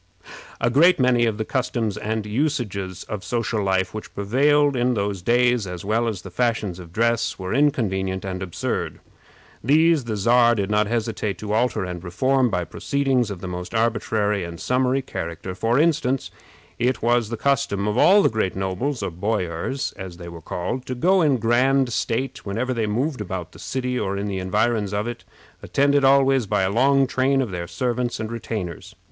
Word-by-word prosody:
A 115 +1 +1
great 165 +7 +5
many 125 -2 +3
of 110 -2 -1
the 110 - -2
customs 115 -5 -1
and 110 0 -3
usages 105 - -2
of 105 -3 -6
social 115 +3 -1
life 95 -1 0
which 110 - -8
prevailed 140 +7 +3
in 125 0 +1
those 100 -3 -2
days, 120 +1 +2
as 90 0 -7
well 115 +3 +1
as 100 -6 -3
the 95 - -9
fashions 110 -3 -1
of 85 -2 -11
dress, 115 +4 0
were 95 -1 -4
inconvenient 95 -9 0
and 95 -1 -4
absurd. 90 -3 -3 0.6
These 155 +2 +4
the 110 -2 -3
Czar 120 +3 +4
did 100 -1 -2
not 105 0 +2
hesitate 110 -3 -2
to 105 +1 -4
alter 110 -3 +1
and 90 -1 -6
reform 130 +8 +1
by 90 -4 -1
proceedings 135 - 0
of 95 -4 -6
the 95 - -5
most 90 +4 -6
arbitrary 110 -3 0
and 85 -1 -7
summary 130 +1 +1
character. 85 -3 -5
For 115 +6 0
instance, 150 -4 +1 0.5
it 125 +1 0
was 120 -2 +2
the 115 - -4
custom 135 -8 0
of 105 - 0
all 195 +10 +6
the - - +4
great 110 -4 -1
nobles, 95 +7 -2
or 95 - -2
boyars, 90 +5 -2
as 95 -3 -8
they 85 -1 -8
were 85 -1 -10
called, 90 +11 -4
to 130 - -3
go 185 +9 +3
in 145 -5 +3
grand 125 +2 +2
state 130 +4 -2
whenever 115 +6 -2
they 115 -3 -1
moved 125 +4 -1
about 90 -4 -5
the - - -15
city 125 -1 -2
or 100 -1 -2
in 100 - -3
the 100 -2 -3
environs 105 +2 0
of 105 +3 -1
it, 120 -1 -6 0.4
attended 140 0 +2
always 135 -3 +4
by 105 -1 +1
a 95 - +1
long 135 +5 +4
train 135 +1 +1
of 125 -6 -1
their 85 -1 -4
servants 120 +7 -2
and 110 0 -4
retainers. 105 -7 -5
115 Hz, 190 wpm, -23 LUFS, 95-130 Hz, 0.6 s, all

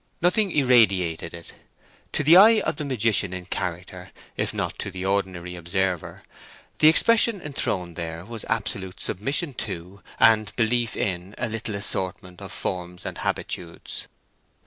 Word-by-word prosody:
Nothing 190 +4 +2
irradiated 100 - +3
it; 85 -1 -11 0.6
to - - 0
the 155 +4 +7
eye 215 +4 +8
of - - -2
the 155 - -3
magician 115 -8 +1
in 90 -1 -6
character, 90 0 -5 0.3
if - - -1
not - - -4
to - - -3
the 95 -1 -6
ordinary 95 -3 -2
observer, 90 0 -2 0.6
the 155 - +7
expression 225 +6 +5
enthroned 95 - -2
there 85 0 -6
was 115 0 -4
absolute 100 -4 -2
submission 135 - -1
to 95 -4 -6 0.2
and 110 -4 +4
belief 120 0 0
in 95 +1 -2
a 120 - -1
little 110 -1 -4
assortment 95 -2 -1
of - - -8
forms 90 -1 -5
and - - -5
habitudes. 85 -2 -4
100 Hz, 145 wpm, -24 LUFS, 90-120 Hz, 0.6 s, eye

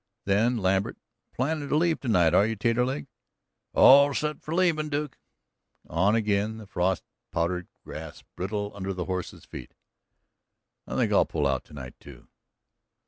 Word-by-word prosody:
Then 110 +5 +2
Lambert: 95 +2 0 0.3
"Plannin' 145 +2 -2
to 150 - +2
leave 165 0 +2
tonight, 90 - +2
are 100 - +5
you 115 - -2
Taterleg?" 115 - 0 0.7
"All 140 +1 +7
set 150 0 -2
for 155 - -8
leavin', 165 -4 +2
Duke." 145 -1 -3 0.7
On 95 +7 +2
again, 105 0 0
the 110 - -10
frost 95 -1 -1 0.3
powdered 85 +2 -1 0.2
grass 75 0 -9
brittle 105 +2 -3
under 95 -1 -4
the 90 -1 -3
horses' 90 -2 -5
feet. - - -10 1.1
"I - - -5
think - - +1
I'll - - +5
pull 75 -3 -1
out 70 -2 0
tonight, 65 -4 -9
too." 65 -4 -14
105 Hz, 145 wpm, -27 LUFS, 90-130 Hz, 1.1 s, All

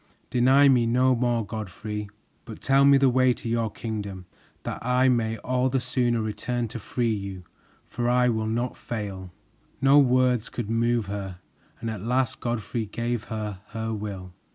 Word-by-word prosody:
Deny 130 +3 +5
me 125 -4 +4
no 130 +2 +3
more, 120 -2 0
Godfrey, 105 0 -5 0.4
but 110 - -9
tell 135 +1 +4
me 140 0 +7
the 135 0 +4
way 130 0 +4
to 120 - -8
your 115 -1 0
kingdom, 100 -4 -5 0.4
that - - -5
I 125 +2 +3
may 115 -2 +1
all 125 +3 0
the 135 +1 +1
sooner 120 -2 0
return 115 +3 -2
to 115 +1 -6
free 115 +1 -1
you, 100 -3 -5 0.4
for 120 0 -2
I 125 0 +4
will 110 -2 0
not 120 +3 -1
fail." 100 -5 -6 0.5
No 135 +2 +6
words 125 -3 +3
could 115 -3 -4
move 115 -1 +1
her, 100 -2 -5 0.4
and 115 - -3
at 105 -4 -6
last 125 +3 0
Godfrey 115 -1 -3
gave 115 +2 -3
her 105 -3 -5
her 110 0 -3
will. 100 -4 -6
115 Hz, 170 wpm, -26 LUFS, 105-125 Hz, 0.5 s, me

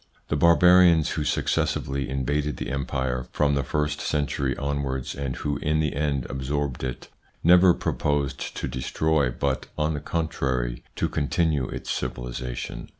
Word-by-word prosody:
The - - +1
Barbarians 85 +1 +6
who 80 - -1
successively 70 -2 0
invaded 70 +3 -1
the - - -4
Empire 65 -2 -2
from 70 -1 +2
the 70 - +2
first 75 +3 -1
century 70 -2 -1
onwards, 70 -2 -2
and 70 -2 -3
who 75 -1 -2
in 75 0 0
the 75 -2 0
end 70 -3 0
absorbed 65 0 -3
it, 65 -1 -5 0.3
never 90 +2 +7
proposed 70 -2 -1
to - - -2
destroy 75 +2 0
but, 65 +2 -2
on 75 +1 +1
the 75 - -2
contrary, 65 -7 -2
to - - 0
continue 75 -2 0
its - - -5
civilisation. - - -4
70 Hz, 145 wpm, -25 LUFS, 65-75 Hz, 0.3 s, never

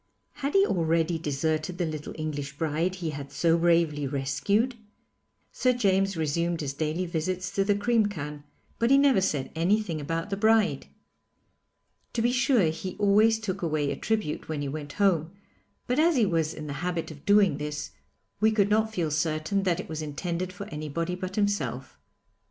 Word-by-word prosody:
Had 280 +4 -3
he 395 0 +6
already 165 - +1
deserted 155 +3 -1
the 175 - 0
little 155 -2 -5
English 145 -2 -4
bride 165 +4 0
he 170 -4 -3
had 140 -1 -7
so 165 +4 +2
bravely 165 -4 +2
rescued? 145 - 0 0.8
Sir 255 -1 +2
James 195 -5 +1
resumed 170 +2 0
his 140 -2 -3
daily 155 +5 -2
visits 180 +2 -2
to 195 0 +1
the 205 +1 +2
cream 225 +1 +2
can, 150 -6 -6 0.4
but 235 - +2
he 275 - +6
never 275 -7 +4
said 145 -8 -1
anything 175 -1 0
about 165 +6 -3
the - - +1
bride. 220 0 +2 1.3
To 230 - 0
be 240 - +3
sure, 245 - +3
he 180 +3 -6
always 210 +2 +4
took 195 -3 -4
away 155 -4 0
a - - -2
tribute 215 -11 -2
when 150 -2 -2
he - - -2
went 145 +1 -6
home, 180 -4 +1 0.5
but 250 +4 0
as 330 +1 +4
he 235 -5 +4
was 165 -4 0
in 155 - -7
the 145 - -4
habit 175 -2 -2
of 145 -2 -12
doing 205 -7 +4
this, 150 0 -4 0.5
we 215 +2 +4
could 210 -2 +2
not 220 +1 +2
feel 170 -7 -1
certain 155 +5 0
that 180 -2 0
it - - -5
was 155 0 -5
intended 170 +4 -3
for 190 +2 -8
anybody 155 +3 -3
but 185 +1 -5
himself. 140 - -1
170 Hz, 180 wpm, -27 LUFS, 155-205 Hz, 1.3 s, he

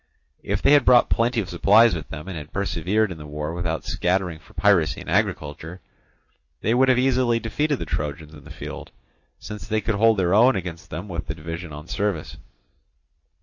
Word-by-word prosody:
If - - -2
they - - +5
had 145 -2 +6
brought 125 -1 +5
plenty 115 0 +2
of 95 - -7
supplies 105 +5 +5
with 80 -3 -5
them, 75 +2 -8
and 95 - -6
had 75 0 -8
persevered 100 +2 0
in 85 - -8
the 75 - -9
war 75 +2 -4
without 85 -2 -3
scattering 90 -2 -1
for - - -21
piracy 95 -7 +3
and - - -10
agriculture, 75 +4 -2 0.8
they 110 - +1
would 130 +2 +4
have 130 - +4
easily 125 -2 +2
defeated 145 +6 -1
the - - -5
Trojans 75 +1 -4
in 75 -3 -13
the - - -13
field, - - -8 0.5
since 105 0 -9
they 110 -1 0
could 110 +1 -1
hold 110 +2 +3
their 90 -1 +1
own 120 +5 +5
against 90 -1 -6
them 90 +6 -6
with 85 -4 -5
the 80 - -4
division 85 +1 -7
on 75 +1 -9
service. 100 -6 -3
95 Hz, 195 wpm, -23 LUFS, 80-115 Hz, 0.8 s, had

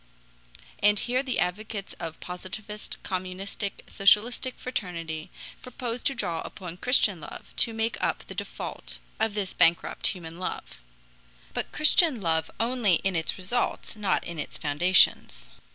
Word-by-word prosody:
And 205 0 +5
here 250 +4 +1
the 265 -2 -2
advocates 200 +2 -2
of 165 -1 -6
Positivist, 195 +4 -7
Communistic, 190 +2 -4
Socialistic 225 +6 +3
fraternity 165 -9 -4 0.3
propose 245 -1 -4
to 275 - +1
draw 175 -8 -2
upon 180 -3 -7
Christian 205 -6 +4
love 145 - -10
to 230 - +4
make 225 +1 -1
up - - 0
the - - -8
default - - -5 0.2
of 220 -1 +1
this 200 -3 -2
bankrupt 165 +1 +3
human 170 -2 -3
love; 60 - -5 0.7
but - - -3
Christian 305 -3 +4
love 160 -3 +1
only 230 -5 +3
in 195 -1 +1
its 160 -1 -1
results, 200 +7 -1
not 205 -3 0
in 170 -2 -6
its - - -4
foundations. 145 - +3
195 Hz, 135 wpm, -27 LUFS, 170-225 Hz, 0.7 s, And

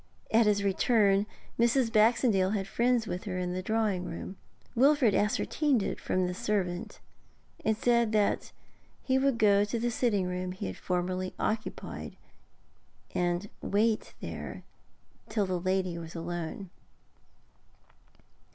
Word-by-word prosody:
At 225 0 +5
his 205 -1 +2
return 200 0 +3 0.3
Mrs. 235 0 +3
Baxendale 215 -3 +4
had 195 -2 -2
friends 240 +1 +1
with 180 +1 -5
her 185 -3 -3
in 180 -1 -2
the 185 - -2
drawing 210 -3 0
room. 180 +3 -6 0.4
Wilfrid 260 -2 +4
ascertained 240 +4 +1
it - - -3
from 185 0 0
the 180 - -2
servant, 190 -4 -2 0.6
and 220 -1 +1
said 235 -1 +2
that 210 -2 +1 0.5
he 260 0 +2
would 270 -2 +2
go 205 -2 +5
to 210 +3 -2
the 240 +1 0
sitting 220 -5 +1
room 180 0 -3
he 185 - -6
had 95 - -4
formerly 185 +1 -2
occupied, 215 0 -3 1.0
and 175 +2 0
wait 215 +2 0
there - - -6 0.7
till 215 -2 +1
the 185 -1 -1
lady 185 -1 -1
was 165 0 -9
alone. 175 +2 -5
205 Hz, 135 wpm, -29 LUFS, 185-230 Hz, 1.0 s, At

